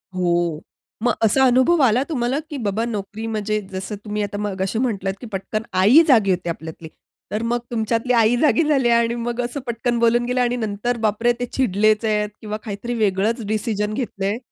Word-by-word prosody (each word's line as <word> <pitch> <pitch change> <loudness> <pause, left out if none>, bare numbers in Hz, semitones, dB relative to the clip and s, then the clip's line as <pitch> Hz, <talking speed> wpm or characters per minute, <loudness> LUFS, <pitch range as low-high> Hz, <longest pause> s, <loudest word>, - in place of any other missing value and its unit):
हो, 175 -3 0 0.4
मग 240 -1 +3
असा 265 +5 +3
अनुभव 260 +6 +4
आला 250 +1 +3
तुम्हाला 260 -2 0
की 295 - -5
बाबा 220 -1 -1
नोकरी 215 -1 -5
म्हणजे 215 -1 -1
जसं 190 +2 -5
तुम्ही 210 0 -2
आता 205 0 -4
मगाशी 195 +1 -2
म्हटलात 200 -6 -1
की 240 - -7
पटकन 205 +3 -3 0.2
आई 245 +12 +7
जागी 220 -9 +5
होती 180 -1 -1
आपल्यातली. 160 0 -7 0.4
तर 210 - -1
मग 240 +1 0
तुमच्यातली 230 +2 0
आई 230 0 +4
जागी 315 +2 +4
झाली 275 -5 +2
आणि 235 0 +2
मग 240 +1 -3
असं 245 +4 -4
पटकन 235 0 -1
बोलून 235 +1 +3
गेल्या 250 0 +1
आणि 245 0 0
नंतर 225 +1 -2
बापरे 220 +3 +2
ते 245 - -1
चिडलेच 215 -3 +1
आहेत 210 -1 +1
किंवा 215 -1 -4
काहीतरी 215 +3 -5
वेगळंच 215 +2 0
डिसिजन 215 -1 -1
घेतलंय? 210 -3 -2
220 Hz, 180 wpm, -21 LUFS, 205-240 Hz, 0.4 s, आई